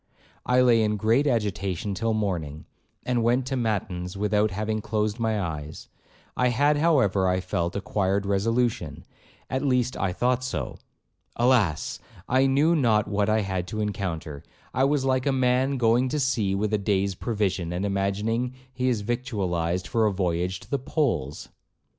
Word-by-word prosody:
I 125 0 +4
lay 120 -3 +5
in 105 -1 +1
great 115 +8 +2
agitation 100 - -1
till 115 +3 -1
morning, 85 -8 -3 0.4
and 125 -1 +1
went 120 +3 +2
to 135 +1 -2
matins 100 -6 -2
without 105 +1 +2
having 110 +2 -2
closed 110 0 -1
my 110 -2 0
eyes, 80 -4 -5 0.5
I 125 - +2
had, 145 +5 +2
however, 130 - +3
I 90 0 +2
felt, 85 -1 -2
acquired 100 0 0
resolution,—at 115 +5 -2
least 125 -2 +1
I 95 -1 -1
thought 125 +6 0
so. 130 - -4 0.6
Alas! 115 - +2 0.3
I 130 +2 +3
knew 145 +5 +3
not 115 -8 +2
what 100 +1 0
I 110 0 +3
had 95 -3 -3
to 110 +3 -5
encounter. 90 -8 -3 0.3
I 130 +2 +3
was 140 -1 +1
like 130 0 +1
a - - +3
man 130 +1 +2
going 120 +2 +3
to 150 - -1
sea 115 -8 +1
with 105 +2 -1
a 105 - +2
day's 100 -1 0
provision, 95 -5 -2
and 90 +3 -2
imagining 105 +5 -1 0.2
he 130 0 0
is 115 -4 0
victualled 95 -7 -2
for 115 -2 +2
a - - +1
voyage 90 -1 -1
to - - -15
the 140 - +1
poles. 125 - -2
110 Hz, 160 wpm, -25 LUFS, 95-125 Hz, 0.6 s, lay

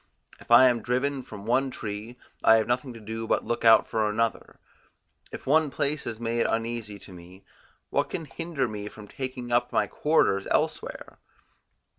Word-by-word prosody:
If - - -17
I 120 +2 +8
am 120 -2 +1
driven 130 +4 -1
from 105 -5 -10
one 130 +4 +2
tree, 110 +1 -6 0.3
I 110 - +7
have 110 -1 +2
nothing 125 +2 -1
to 115 - -11
do 110 +1 -6
but - - +1
look 120 - -2
out 115 -1 +6
for 110 -1 0
another; 115 +1 -2 0.7
if - - -8
one 155 +2 +3
place 145 +3 -2
is 110 - -5
made 115 0 0
uneasy 115 -2 -3
to 100 - -13
me, 90 +2 -14 0.5
what - - +1
can 165 - -4
hinder 155 -3 -3
me 105 -2 -6
from 105 0 -11
taking 130 0 -6
up 120 0 +2
my - - +2
quarters 100 -11 +1
elsewhere? - - -2
120 Hz, 175 wpm, -27 LUFS, 110-130 Hz, 0.7 s, I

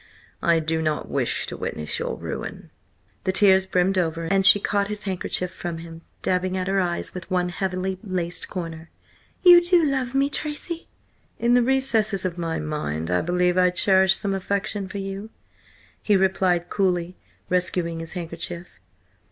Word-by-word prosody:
I 170 -1 +3
do 160 0 -1
not 155 -1 -2
wish - - 0
to - - -6
witness 75 -1 -3
your - - -3
ruin." - - -6 0.5
The 190 - +1
tears 190 -1 +4
brimmed 185 +1 +2
over, 165 -1 -1
and 195 +3 +2
she 190 +2 +7
caught 200 0 0
his 210 0 -5
handkerchief 185 -1 -2
from 170 -1 -5
him, 165 0 -10 0.2
dabbing 185 0 0
at 185 - -1
her 195 0 +1
eyes 175 -2 -1
with 180 -1 -8
one 180 -1 +1
heavily 185 +1 -3
laced 180 -4 -3
corner. 165 -3 -6 0.5
"You 350 -1 +9
do 345 -2 +4
love 265 -3 -1
me, 275 +1 +3
Tracy?" 305 +4 -4 0.5
"In 235 +1 +2
the 245 - +5
recesses 230 -6 +1
of 175 -1 -3
my 165 -1 -2
mind 90 - -3
I 90 - +2
believe 180 +1 +1
I 180 0 +5
cherish 190 +1 +4
some 200 -1 -2
affection 200 +1 -2
for 200 - -7
you," 195 +2 -5 0.7
he 205 -2 +3
replied 185 -2 +1
coolly, 180 -2 0 0.3
rescuing 175 -2 0
his 165 0 -4
handkerchief. 175 0 -6
185 Hz, 165 wpm, -24 LUFS, 170-200 Hz, 0.7 s, You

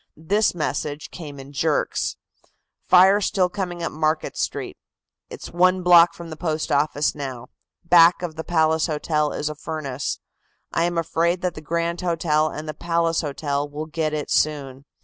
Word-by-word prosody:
This 200 +6 +1
message 150 -1 -3
came 145 -5 -9
in 135 +1 -11
jerks: 150 +1 0 0.7
"Fire 190 +3 +6
still 185 -2 +1
coming 175 -2 -4
up - - -2
Market 155 +1 -1
Street. - - -3 0.5
It's - - -9
one 185 +1 +3
block 175 -1 +6
from 170 -1 -9
the - - -5
Post 155 -1 -2
Office 145 0 +1
now; 130 -4 -7 0.3
back 170 +1 +6
of 165 -3 -4
the 160 - -5
Palace 160 -1 +2
Hotel 150 -1 0
is 150 - -3
a 155 - -2
furnace. 150 -3 -4 0.5
I 165 - +2
am 175 0 -2
afraid 170 +2 0
that 180 -2 -1
the 155 - -9
Grand 170 +2 -2
Hotel 160 -3 +1
and 155 +1 -7
the 155 - -4
Palace 165 +1 0
Hotel 145 -1 -2
will 150 +2 -5
get 155 0 -2
it 150 -1 -4
soon. 140 -3 0
160 Hz, 170 wpm, -23 LUFS, 150-170 Hz, 0.7 s, Fire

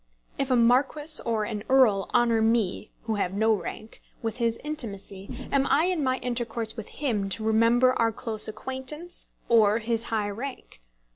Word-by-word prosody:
If 275 - 0
a 255 - +3
marquis 275 +6 +3
or 225 -2 0
an 210 -1 -4
earl 240 -7 +4
honour 230 -2 +3
me, 220 -3 +1 0.2
who 220 -2 -2
have 195 -1 -1
no 220 +2 +3
rank, 215 +1 -6 0.2
with 225 0 -3
his 230 -2 0
intimacy, 230 -5 -3
am 275 -1 +2
I 300 - +3
in 360 -5 0
my 260 -1 +1
intercourse 235 -3 -2
with 220 -3 -7
him 220 -9 -2
to 215 +3 -2
remember 230 +3 +4
our 230 -1 +3
close 220 -1 -2
acquaintance 265 +9 -6 0.2
or 220 -2 +4
his 230 0 -2
high 210 -2 -1
rank? 250 - -7
230 Hz, 165 wpm, -26 LUFS, 215-260 Hz, 0.2 s, earl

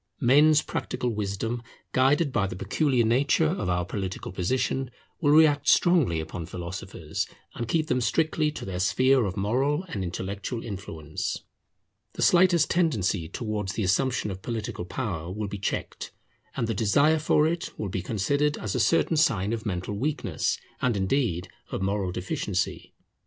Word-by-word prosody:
Men's 150 +4 +5
practical 125 - -2
wisdom, 105 +3 -2 0.3
guided 140 +4 +3
by 100 -5 +2
the 95 - -6
peculiar 120 - +1
nature 135 +7 +3
of 160 - -2
our 90 -1 0
political 95 0 -4
position, 125 +7 -1 0.3
will 145 - +3
react 150 -1 +5
strongly 160 - +4
upon 80 +1 -6
philosophers, 90 -2 -5 0.3
and 120 - -4
keep 160 +4 +1
them 125 -5 0
strictly 155 +4 +1
to - - -6
their 95 -2 -4
sphere 130 +5 +3
of 95 - -5
moral 135 - +1
and 100 - -3
intellectual 100 +6 -4
influence. 80 -7 -5 0.7
The - - -2
slightest 175 -3 +5
tendency 105 - +1
towards 105 -3 -3
the 105 - -2
assumption 105 +3 +1
of 95 0 -7
political 110 -6 -4
power 90 -6 -4
will 105 +2 -3
be 100 0 -6
checked, 100 - -3 0.5
and 120 - +1
the 115 - -1
desire 140 +10 +3
for 150 0 +3
it 170 +2 -2
will 105 - -3
be 95 - -2
considered 140 +10 0
as 105 -3 -3
a - - 0
certain 165 -1 +3
sign 110 -9 +2
of 115 -1 -4
mental 90 +1 -3
weakness, 145 +8 -1 0.2
and 120 -4 +1
indeed 95 -3 0 0.2
of - - -3
moral 100 -1 0
deficiency. 90 +1 -3
110 Hz, 155 wpm, -26 LUFS, 95-145 Hz, 0.7 s, Men's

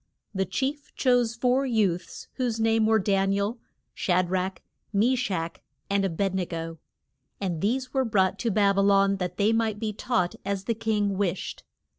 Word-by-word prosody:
The 190 -2 -1
chief 275 - -3
chose 245 -3 +2
four 250 +3 +2
youths 210 -9 -1
whose 240 -3 -1
name 225 -1 +3
were 220 0 +4
Dan 195 -1 +1
i - - +1
el, 205 +4 -1 0.3
Sha 180 0 +2
drach, 185 +1 -1 0.3
Me 225 +5 +3
shach 185 -9 -2 0.3
and 200 0 +2
A 195 - +1
bed 190 +3 -1
ne 185 -2 -1
go. 165 -1 -5 0.6
And 175 -5 -2
these 250 +5 -1
were 265 -1 +2
brought 195 -6 +1
to 235 - 0
Bab 200 -1 +3
y - - +5
lon, 195 0 +4
that 180 -1 -4
they 210 +2 +3
might 225 -2 +1
be 215 0 -3
taught 185 -5 0
as 200 -1 -2
the 230 - 0
king 210 -3 0
wished. 190 -2 -2
200 Hz, 185 wpm, -26 LUFS, 190-225 Hz, 0.6 s, y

